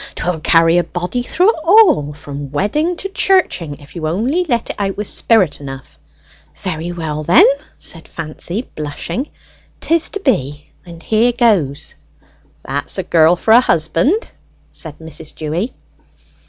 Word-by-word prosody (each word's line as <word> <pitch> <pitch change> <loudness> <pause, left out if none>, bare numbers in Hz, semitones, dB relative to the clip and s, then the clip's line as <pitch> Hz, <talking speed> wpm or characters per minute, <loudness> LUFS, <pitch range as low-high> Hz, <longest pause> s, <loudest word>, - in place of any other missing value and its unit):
'Twill 175 -2 -2
carry 165 +2 +4
a - - +1
body 180 +9 -3
through 360 - +3
it 455 - -8
all 340 - +5
from 145 -1 -8
wedding 295 - 0
to 390 - -4
churching, 370 - +1
if 145 +2 -17
you 160 -2 -3
only 240 - 0
let 235 -2 0
it - - -9
out 195 -1 -2
with 210 -1 -3
spirit 190 -12 +2
enough." 135 - -9 0.6
"Very 175 -2 -4
well, 155 -3 -4
then," 170 +4 +7 0.3
said 165 -2 -6
Fancy, 170 +6 -5
blushing. 155 - -4 0.5
"'Tis 330 0 +1
to 405 - -4
be, 150 - -1 0.2
and 170 -1 -11
here 225 +3 +3
goes!" 205 - +1 0.7
"That's 140 +7 -2
a 190 - -1
girl 165 0 +4
for 220 - 0
a 235 +2 +8
husband!" 170 - +1 0.4
said 155 -3 -7
Mrs. 160 -1 -7
Dewy. 165 +10 -3
175 Hz, 150 wpm, -17 LUFS, 155-240 Hz, 0.7 s, a